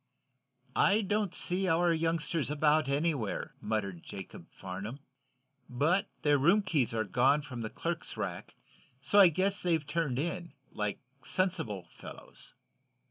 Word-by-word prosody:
"I 210 +2 +4
don't 205 -1 0
see 185 +1 +1
our 170 0 +3
youngsters 165 -1 -1
about, 150 0 +2
anywhere," 140 -6 -1
muttered 100 -6 -2
Jacob 95 -3 -9
Farnum. 100 +9 -7 0.7
"But 170 - +1 0.2
their 145 -1 +4
room 185 +9 +4
keys 155 -10 +1
are 110 -1 0
gone 135 +6 +2
from 130 -5 -7
the 110 - -3
clerk's - - -4
rack, - - -5 0.4
so 200 +9 +3
I 195 - +10
guess 190 +4 0
they've 165 -4 +1
turned 145 -4 -1
in, 170 +1 -3 0.2
like 105 -1 -3 0.2
sensible 160 - -1
fellows." - - -12
150 Hz, 135 wpm, -31 LUFS, 120-175 Hz, 0.7 s, I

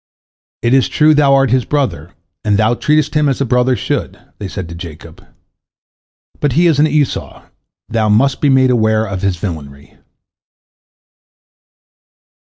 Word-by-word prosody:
"It 120 +1 +2
is 135 -1 +3
true, 155 0 +3
thou 145 -2 +4
art 135 -3 +2
his 130 -1 +2
brother, 145 0 -3 0.3
and 105 -2 +1
thou 110 +2 +2
treatest 150 +3 0
him 150 -2 +2
as 135 - -2
a 140 - 0
brother 125 +1 +1
should," - - -3 0.2
they 100 - -5
said 95 -2 -6
to - - -8
Jacob, 85 -1 -11 1.2
"but 145 -4 0
he 170 +5 +3
is 160 -4 +2
an 155 - +4
Esau, 150 -3 -2 0.4
thou 110 -1 -1
must 130 +6 +2
be 145 - +2
made 130 -1 +3
aware 110 -2 +1
of 95 -3 -5
his 100 -3 -1
villainy." 75 -7 -8
125 Hz, 155 wpm, -15 LUFS, 100-140 Hz, 1.2 s, thou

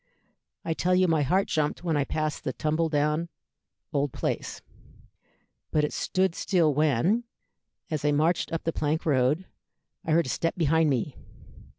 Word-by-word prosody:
I 165 - 0
tell 180 +3 +1
you 185 0 +4
my 160 -3 +2
heart 185 +8 +2
jumped 155 +2 -1
when 165 -3 0
I 145 -2 +1
passed 155 0 -2
the 130 - -2
tumble 155 +3 0
down 150 +2 0 0.6
old 140 -1 0
place; - - -3 1.1
but 150 - +1
it 150 - -1
stood 185 -1 0
still 170 -5 +2
when, 155 - +2 0.7
as 155 -3 -2
I 150 - +3
marched 160 +4 +1
up 165 - -3
the 165 - -1
plank 155 +1 -1
road, 145 +4 +2 0.6
I 160 - 0
heard 170 +1 +4
a - - -5
step 165 +6 -1
behind 160 -1 +3
me. 130 0 -1
155 Hz, 165 wpm, -27 LUFS, 145-165 Hz, 1.1 s, you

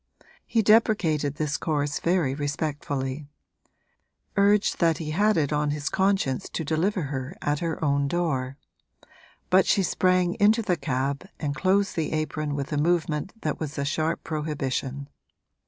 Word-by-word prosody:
He 225 -2 +2
deprecated 195 - +3
this 150 0 -1
course 145 -2 -1
very 170 -6 +1
respectfully; 145 -1 -3 1.1
urged 200 +1 +3
that 165 -3 +3
he 155 -1 -4
had 210 +5 +2
it 150 -2 +1
on 150 0 +1
his 145 0 -2
conscience 190 -9 0
to - - -2
deliver 170 +5 0
her 135 +3 -4
at 145 -5 -1
her 165 -2 -2
own 140 0 +2
door; 140 -5 -1 0.9
but 185 +1 +5
she 200 - +3
sprang 180 -1 +2
into 220 +3 +4
the 185 -4 +1
cab 140 +3 -2
and 145 -2 -2
closed 195 +4 +1
the 160 -2 -1
apron 155 -1 -2
with 140 +2 -4
a - - 0
movement 170 +5 -1
that 155 - -2
was 155 -2 -5
a 140 - -1
sharp 155 +3 -1
prohibition. 140 -3 -3
155 Hz, 150 wpm, -26 LUFS, 145-185 Hz, 1.1 s, but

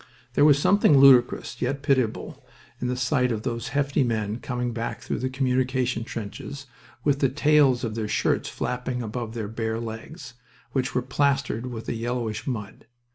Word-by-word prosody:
There 145 - +4
was 145 -2 +6
something 155 -1 +4
ludicrous, 130 -3 +5
yet 135 +3 -1
pitiable, 130 -6 0 0.4
in 125 - -2
the 125 - -1
sight 125 0 +1
of 110 -1 -3
those 120 -1 -3
hefty 140 0 +1
men 110 -2 -1
coming 125 -2 -3
back 115 0 -4
through - - -3
the 130 - -1
communication 130 -2 0
trenches 115 +6 -7 0.4
with 145 -1 +2
the 135 - +3
tails 145 -2 +3
of 115 -3 -2
their 110 -1 -3
shirts - - 0
flapping 125 0 -3
above 115 +1 -5
their 110 -3 -3
bare 110 +1 -3
legs, 115 +4 -8 0.4
which 130 -3 -1
were 125 - +1
plastered 135 -2 0
with 115 -3 -7
a - - -1
yellowish 115 -1 -3
mud. 105 -6 -5
125 Hz, 170 wpm, -25 LUFS, 115-135 Hz, 0.4 s, was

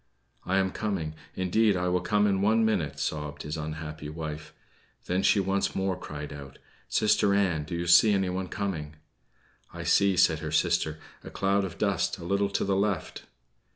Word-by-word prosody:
"I 95 - +2
am 95 -1 +1
coming; 95 -9 -3 0.2
indeed 100 +2 +2
I 90 0 -1
will 90 0 +1
come 105 +2 +2
in 95 -2 +1
one 110 +2 +3
minute," 90 -10 0
sobbed 75 -1 -3
his 75 +1 -4
unhappy 75 -1 -6
wife. 75 -1 -6 0.5
Then 90 +1 0
she 100 - +4
once 95 0 0
more 95 -1 0
cried 75 -4 -7
out: 70 -1 -10 0.3
"Sister 105 -2 +3
Ann, 90 -7 +1
do 85 - -5
you 85 +1 -2
see 95 +5 +6
anyone 95 -2 0
coming?" 85 -7 -4 0.8
"I - - -7
see," 100 -2 +3
said 85 -4 +4
her 75 -1 -5
sister, 80 -1 +1 0.3
"a - - -8
cloud 100 +1 +1
of 90 -3 -5
dust 100 -2 0
a 85 - -9
little 100 +2 +1
to 100 - -1
the 100 -1 +1
left." 100 -3 -2
90 Hz, 180 wpm, -28 LUFS, 80-100 Hz, 0.8 s, see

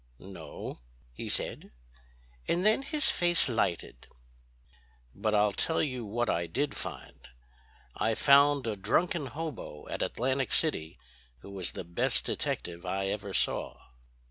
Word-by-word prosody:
"No," 95 -6 -8 0.3
he - - -6
said; - - -2 0.8
and 175 +3 +1
then 220 +5 +5
his 300 +2 +2
face 175 -2 +3
lighted. 90 - -1 1.1
"But 110 -1 0
I'll 105 0 +4
tell 160 +11 +1
you 130 -6 -2
what 120 +3 -1
I 85 -3 0
did 140 - -1
find. - - -7 0.7
I 110 0 +1
found 140 +1 +6
a 110 -2 -1
drunken 145 - +1
hobo 145 - -6
at - - -3
Atlantic 130 +2 0
City 85 - -1 0.4
who 100 - -10
was 95 -3 -3
the - - -5
best 85 0 0
detective 85 0 -2
I 95 +1 -1
ever 100 0 -3
saw." - - 0
115 Hz, 135 wpm, -30 LUFS, 95-145 Hz, 1.1 s, found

